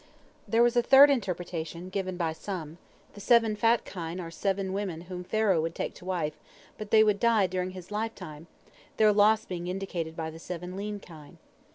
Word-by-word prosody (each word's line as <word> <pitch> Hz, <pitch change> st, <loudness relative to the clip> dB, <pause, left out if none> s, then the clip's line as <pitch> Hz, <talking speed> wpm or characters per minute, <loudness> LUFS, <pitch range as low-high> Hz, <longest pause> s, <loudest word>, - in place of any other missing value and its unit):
There 230 Hz, +1 st, +4 dB
was 240 Hz, 0 st, +3 dB
a 240 Hz, -, +5 dB
third 275 Hz, +3 st, +8 dB
interpretation, 175 Hz, -, -3 dB
given 185 Hz, -1 st, -3 dB
by 165 Hz, -3 st, -1 dB
some: 165 Hz, -2 st, -7 dB, 0.3 s
The 205 Hz, -, -12 dB
seven 230 Hz, -1 st, +4 dB
fat 230 Hz, +2 st, +2 dB
kine 175 Hz, -1 st, -6 dB
are 165 Hz, -2 st, -6 dB
seven 195 Hz, +2 st, -2 dB
women 190 Hz, -5 st, -3 dB
whom 180 Hz, 0 st, -7 dB
Pharaoh 195 Hz, -2 st, +1 dB
would 165 Hz, +1 st, -3 dB
take -, -, -3 dB
to -, -, -14 dB
wife, 170 Hz, -5 st, -2 dB, 0.4 s
but 215 Hz, -1 st, -6 dB
they 220 Hz, 0 st, +6 dB
would 210 Hz, -2 st, +2 dB
die 230 Hz, -4 st, +3 dB
during 185 Hz, 0 st, -2 dB
his 185 Hz, +2 st, -11 dB
lifetime, 210 Hz, -8 st, -5 dB, 0.5 s
their 215 Hz, -1 st, +5 dB
loss 215 Hz, +1 st, +4 dB
being 175 Hz, -1 st, -5 dB
indicated 180 Hz, -3 st, -4 dB
by 160 Hz, -1 st, -4 dB
the 160 Hz, -, -11 dB
seven 180 Hz, +1 st, -7 dB
lean 205 Hz, +1 st, -4 dB
kine. 155 Hz, -6 st, -14 dB
185 Hz, 190 wpm, -28 LUFS, 170-210 Hz, 0.5 s, third